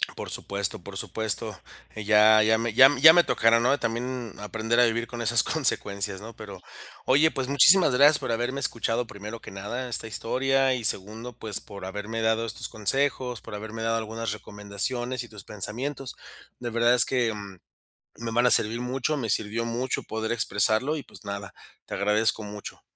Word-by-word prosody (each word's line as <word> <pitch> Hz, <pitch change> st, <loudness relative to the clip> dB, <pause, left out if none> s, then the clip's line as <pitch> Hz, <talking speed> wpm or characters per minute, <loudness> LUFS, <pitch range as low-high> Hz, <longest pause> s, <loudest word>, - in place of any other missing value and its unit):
Por -, -, -7 dB
supuesto, 100 Hz, -2 st, -2 dB
por 100 Hz, +2 st, -11 dB
supuesto. 110 Hz, -2 st, -3 dB, 0.4 s
Eh, 110 Hz, -, -6 dB
ya 110 Hz, +1 st, +6 dB
ya 110 Hz, +1 st, +3 dB
me 115 Hz, -1 st, -2 dB
ya 130 Hz, +3 st, +8 dB
ya 160 Hz, +3 st, +10 dB
me 175 Hz, 0 st, +5 dB
tocará, 115 Hz, +1 st, +3 dB
¿no? 125 Hz, +4 st, +2 dB
También 120 Hz, -1 st, -4 dB
aprender 110 Hz, +3 st, -1 dB
a 125 Hz, -, +6 dB
vivir 115 Hz, +1 st, -1 dB
con 120 Hz, -1 st, -7 dB
esas 115 Hz, 0 st, +3 dB
consecuencias 100 Hz, -9 st, -1 dB
¿no?, 115 Hz, +2 st, -10 dB
pero 105 Hz, -3 st, -10 dB, 0.5 s
oye, 150 Hz, +5 st, +4 dB
pues, 130 Hz, -2 st, -3 dB
muchísimas 150 Hz, +2 st, +6 dB
gracias 145 Hz, +4 st, +6 dB
por -, -, -4 dB
haberme 120 Hz, +4 st, -2 dB
escuchado, 115 Hz, +1 st, -1 dB
primero 105 Hz, +2 st, -9 dB
que -, -, -11 dB
nada, 105 Hz, +6 st, -5 dB
esta 115 Hz, -1 st, -2 dB
historia. 135 Hz, +4 st, 0 dB
Y 120 Hz, -, -5 dB
segundo, 110 Hz, +5 st, -2 dB
pues, 110 Hz, -3 st, -4 dB
por 100 Hz, -2 st, -11 dB
haberme 105 Hz, +4 st, -5 dB
dado 110 Hz, +1 st, +1 dB
estos 115 Hz, -, -6 dB
consejos, 125 Hz, +2 st, -1 dB
por 115 Hz, -, -11 dB
haberme 110 Hz, +2 st, -7 dB
dado 115 Hz, 0 st, 0 dB
algunas 115 Hz, -1 st, -4 dB
recomendaciones 105 Hz, +5 st, -4 dB
y 120 Hz, -, -13 dB
tus 105 Hz, -2 st, -12 dB
pensamientos. 125 Hz, +7 st, -3 dB, 0.4 s
De 120 Hz, -, -4 dB
verdad, 120 Hz, +1 st, +2 dB
es 125 Hz, -, +6 dB
que 120 Hz, -4 st, 0 dB
mm, 100 Hz, -2 st, -9 dB, 0.6 s
me 115 Hz, 0 st, -4 dB
van 120 Hz, +2 st, +2 dB
a 125 Hz, -, +4 dB
servir 110 Hz, +2 st, +4 dB
mucho. 130 Hz, +4 st, -2 dB
Me 115 Hz, -5 st, -3 dB
sirvió 110 Hz, +3 st, 0 dB
mucho 120 Hz, +2 st, -2 dB
poder 110 Hz, 0 st, -4 dB
expresarlo 115 Hz, +5 st, +2 dB
y, 145 Hz, -, -7 dB
pues, -, -, -16 dB
nada. 100 Hz, 0 st, -6 dB, 0.3 s
Te -, -, -9 dB
agradezco 105 Hz, +2 st, +1 dB
mucho. 105 Hz, 0 st, -9 dB
115 Hz, 185 wpm, -26 LUFS, 105-125 Hz, 0.6 s, ya